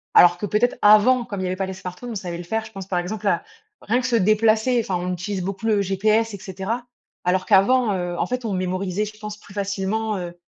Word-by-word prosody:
Alors 175 Hz, 0 st, +7 dB
que -, -, -2 dB
peut-être 220 Hz, +5 st, +1 dB
avant, 215 Hz, +4 st, +6 dB
comme 205 Hz, -5 st, -6 dB
il -, -, -2 dB
y 185 Hz, -, -1 dB
avait 185 Hz, -, -1 dB
pas 190 Hz, 0 st, -2 dB
les 190 Hz, -, -5 dB
smartphones, 185 Hz, +6 st, -8 dB
on 225 Hz, -, -5 dB
savait 175 Hz, -3 st, -4 dB
le 175 Hz, -, -7 dB
faire. 220 Hz, +5 st, -2 dB
Je 220 Hz, -, -12 dB
pense, 195 Hz, -2 st, -8 dB
par 180 Hz, -, -1 dB
exemple, 205 Hz, +4 st, -4 dB
à -, -, +1 dB, 0.4 s
rien 245 Hz, +4 st, +1 dB
que 255 Hz, -, -2 dB
se 245 Hz, -, +1 dB
déplacer. 220 Hz, +3 st, +3 dB
Enfin, 190 Hz, -, -2 dB
on 180 Hz, +1 st, -2 dB
utilise 185 Hz, +1 st, -4 dB
beaucoup 195 Hz, +4 st, -4 dB
le 210 Hz, -2 st, +3 dB
GPS 215 Hz, +3 st, +1 dB
et 200 Hz, -, -7 dB
cetera. 195 Hz, +6 st, -4 dB, 0.4 s
Alors 185 Hz, +1 st, +1 dB
qu'avant, 215 Hz, +3 st, +4 dB
heu, 175 Hz, -2 st, -3 dB
en -, -, 0 dB
fait, 250 Hz, 0 st, -3 dB
on 215 Hz, -4 st, -2 dB
mémorisait, 185 Hz, +2 st, -1 dB
je 215 Hz, 0 st, -10 dB
pense, 210 Hz, -1 st, -7 dB
plus 205 Hz, -, -16 dB
facilement, 200 Hz, +2 st, -2 dB
heu, 175 Hz, -1 st, -5 dB
200 Hz, 250 wpm, -22 LUFS, 185-220 Hz, 0.4 s, Alors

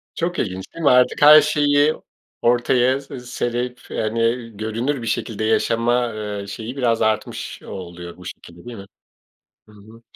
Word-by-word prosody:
Çok 175 Hz, +1 st, -2 dB
ilginç 95 Hz, -2 st, -3 dB
değil 165 Hz, -, -7 dB
mi? -, -, +6 dB
Artık 125 Hz, +3 st, +3 dB
her 150 Hz, +1 st, +10 dB
şeyi, 145 Hz, 0 st, +2 dB, 0.5 s
ortaya 125 Hz, +2 st, +2 dB
serip, 125 Hz, -2 st, -4 dB
hani, 115 Hz, +2 st, -1 dB
görünür 115 Hz, +6 st, -2 dB
bir -, -, -6 dB
şekilde 110 Hz, -1 st, -2 dB
yaşama, 115 Hz, +2 st, +1 dB
eee, 105 Hz, -2 st, -5 dB
şeyi 110 Hz, +5 st, -7 dB
biraz 120 Hz, -4 st, +1 dB
artmış 110 Hz, 0 st, -2 dB
oluyor 85 Hz, -2 st, -9 dB
bu 90 Hz, -, -14 dB
şekilde, 85 Hz, 0 st, -11 dB
değil 120 Hz, -1 st, -8 dB
mi? 100 Hz, -, -10 dB, 0.8 s
Hı 105 Hz, -, -17 dB
hı. 110 Hz, +3 st, -17 dB
115 Hz, 150 wpm, -21 LUFS, 110-125 Hz, 0.8 s, her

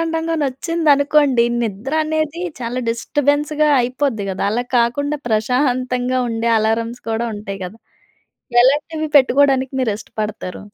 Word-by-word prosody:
టంగొచ్చిందనుకోండి, 295 Hz, -4 st, +2 dB, 0.2 s
నిద్ర 220 Hz, +7 st, -4 dB
అనేది 315 Hz, +1 st, -2 dB, 0.2 s
చాలా 245 Hz, +1 st, -3 dB
డిస్టర్బెన్‌స్‌గా 290 Hz, +5 st, 0 dB
అయిపోద్ది 250 Hz, -4 st, -1 dB
కదా! 190 Hz, -, -3 dB
అలా 240 Hz, +2 st, -1 dB
కాకుండా 285 Hz, +5 st, 0 dB
ప్రశాంతంగా 250 Hz, +2 st, 0 dB
ఉండే, 230 Hz, +1 st, -1 dB
అలార్‌మ్స్ 225 Hz, +2 st, -1 dB
కూడా 230 Hz, +1 st, -1 dB
ఉంటాయి 195 Hz, -1 st, -7 dB
కదా! 205 Hz, +5 st, -10 dB, 0.9 s
ఎలాంటివి 300 Hz, +4 st, +1 dB
పెట్టుకోవడానికి 270 Hz, -1 st, +3 dB
మీరు 225 Hz, -5 st, +1 dB
ఇష్టపడతారు? 210 Hz, -5 st, -6 dB
255 Hz, 105 wpm, -19 LUFS, 230-290 Hz, 0.9 s, పెట్టుకోవడానికి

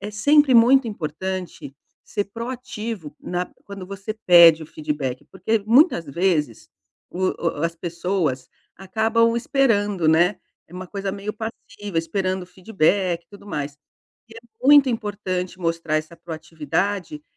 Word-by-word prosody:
é 210 Hz, -, -6 dB
sempre 285 Hz, +7 st, +4 dB
muito 240 Hz, +2 st, +6 dB
importante 180 Hz, -4 st, -5 dB, 0.3 s
ser 205 Hz, -1 st, -3 dB
proativo 230 Hz, -, -6 dB
na 180 Hz, 0 st, -3 dB, 0.2 s
quando 195 Hz, -2 st, -9 dB
você 200 Hz, +2 st, -6 dB
pede 170 Hz, -3 st, +8 dB
o -, -, -13 dB
feedback, 150 Hz, -5 st, -4 dB
porque, 205 Hz, +3 st, -1 dB
muitas 235 Hz, -, +4 dB
vezes, 150 Hz, -, -1 dB, 0.4 s
o 185 Hz, +1 st, 0 dB, 0.3 s
o 150 Hz, -, -3 dB
as 165 Hz, 0 st, -1 dB
pessoas 170 Hz, -6 st, -2 dB, 0.3 s
acabam 225 Hz, +4 st, +1 dB
esperando, 205 Hz, -, +1 dB
né. 175 Hz, +5 st, +3 dB, 0.3 s
É -, -, -19 dB
uma 185 Hz, 0 st, -7 dB
coisa 195 Hz, 0 st, -4 dB
meio 205 Hz, +1 st, -5 dB
passiva, 205 Hz, -4 st, -6 dB
esperando 185 Hz, +2 st, -2 dB
feedback 180 Hz, -1 st, 0 dB
e -, -, -58 dB
tudo 200 Hz, 0 st, -15 dB
mais, 145 Hz, -6 st, -4 dB, 0.5 s
e 225 Hz, -, -15 dB
é -, -, -9 dB, 0.3 s
muito 285 Hz, -1 st, +7 dB
importante 195 Hz, -5 st, -3 dB
mostrar 165 Hz, -2 st, -1 dB
essa 155 Hz, +2 st, -4 dB
proatividade 170 Hz, -, -3 dB
190 Hz, 135 wpm, -22 LUFS, 165-215 Hz, 0.5 s, pede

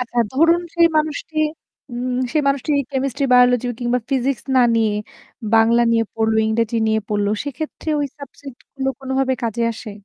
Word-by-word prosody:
আচ্ছা, 245 Hz, -1 st, -3 dB
ধরুন, 330 Hz, +5 st, +4 dB
সেই 340 Hz, -1 st, +5 dB
মানুষটি 310 Hz, +1 st, -2 dB, 0.5 s
উম 250 Hz, +1 st, -3 dB, 0.2 s
সেই 305 Hz, -, +2 dB
মানুষটি 275 Hz, +2 st, 0 dB, 0.2 s
কেমিস্ট্রি, 270 Hz, 0 st, -1 dB
বায়োলজি 250 Hz, -1 st, +5 dB
কিংবা 245 Hz, +1 st, +1 dB
ফিজিক্স 265 Hz, 0 st, 0 dB
না -, -, +6 dB, 0.2 s
নিয়ে 220 Hz, -2 st, +2 dB, 0.6 s
বাংলা 225 Hz, +1 st, +4 dB
নিয়ে 230 Hz, 0 st, +2 dB
পড়ল, 220 Hz, 0 st, +1 dB
ইংরেজি 230 Hz, +1 st, 0 dB
নিয়ে 220 Hz, 0 st, +1 dB
পড়ল 205 Hz, -1 st, 0 dB, 0.2 s
সেক্ষেত্রে 310 Hz, +2 st, -6 dB
ওই 290 Hz, -, 0 dB
সাবজেক্ট 280 Hz, -2 st, -11 dB, 0.2 s
গুলো 270 Hz, -1 st, -2 dB
কোনোভাবে 265 Hz, 0 st, 0 dB
কাজে 230 Hz, 0 st, -2 dB
আসে? 225 Hz, 0 st, -9 dB
250 Hz, 155 wpm, -20 LUFS, 230-280 Hz, 0.6 s, না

